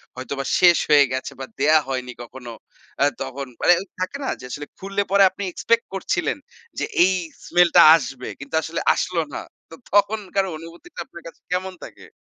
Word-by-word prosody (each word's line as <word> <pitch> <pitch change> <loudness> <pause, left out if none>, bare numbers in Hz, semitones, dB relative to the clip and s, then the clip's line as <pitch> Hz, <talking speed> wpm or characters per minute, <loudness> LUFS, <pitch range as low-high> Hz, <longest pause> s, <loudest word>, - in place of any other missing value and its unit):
হয়তো 130 +2 -6
বা 135 - -3
শেষ 175 -2 +6
হয়ে 145 -1 +7
গেছে 130 - -3
বা 130 - -5
দেয়া 155 +2 +5
হয়নি 125 -2 -3
কখনো। 120 -1 -10 0.5
আ - - +6 0.2
তখন 135 +1 -5 0.2
মানে 175 - +6 0.3
থাকে 185 +9 -3
না - - -2
যে, 125 - -10
আসলে 145 0 -5
খুললে 195 +1 -2
পরে 200 0 +6
আপনি 200 - -7
expect 230 0 +1
করছিলেন 195 - -1 0.4
যে, - - 0 0.2
এই 190 +1 +4 0.3
smell 175 0 +4
টা - - +10 0.2
আসবে 130 -3 -7
কিন্তু 140 +3 -6
আসলে 165 +1 -4
আসল 180 -2 -3 0.2
না। - - -4 0.3
তো 165 - -11 0.2
তখনকার 200 -1 +1
অনুভূতিটা 165 - -12
আপনার 170 -10 -13
কাছে - - -13
কেমন 185 +1 -2
থাকে? - - -12
165 Hz, 180 wpm, -22 LUFS, 135-190 Hz, 0.5 s, টা